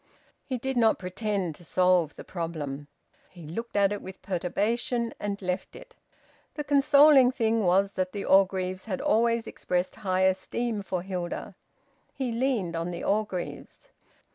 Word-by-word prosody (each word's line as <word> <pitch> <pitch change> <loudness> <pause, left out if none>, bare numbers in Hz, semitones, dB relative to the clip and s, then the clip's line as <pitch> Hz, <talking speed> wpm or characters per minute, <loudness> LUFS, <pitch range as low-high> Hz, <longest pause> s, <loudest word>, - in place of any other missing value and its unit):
He 260 - -3
did 265 +2 -3
not 225 -2 +4
pretend 190 -2 -2
to 175 - -14
solve 180 -2 +2
the - - -9
problem. 150 -5 -5 0.4
He 175 -2 -13
looked 225 +10 -6
at 200 -1 +4
it 205 - -5
with 190 0 -10
perturbation, 230 +6 -1
and 205 -1 -3
left 180 +1 -3
it. - - -13 0.6
The 295 - -3
consoling 285 -2 +6
thing 225 -3 +1
was 195 +1 +3
that 185 -1 -2
the 200 0 -5
Orgreaves 190 -1 +2
had 195 -4 -3
always 230 +1 +2
expressed 180 0 -2
high 185 -3 0
esteem 205 +4 0
for 185 -2 -3
Hilda. 180 -2 -4 0.6
He 260 -3 -2
leaned 230 -8 0
on 165 +1 -2
the 170 -1 -5
Orgreaves. 205 - -3
195 Hz, 150 wpm, -27 LUFS, 180-230 Hz, 0.6 s, consoling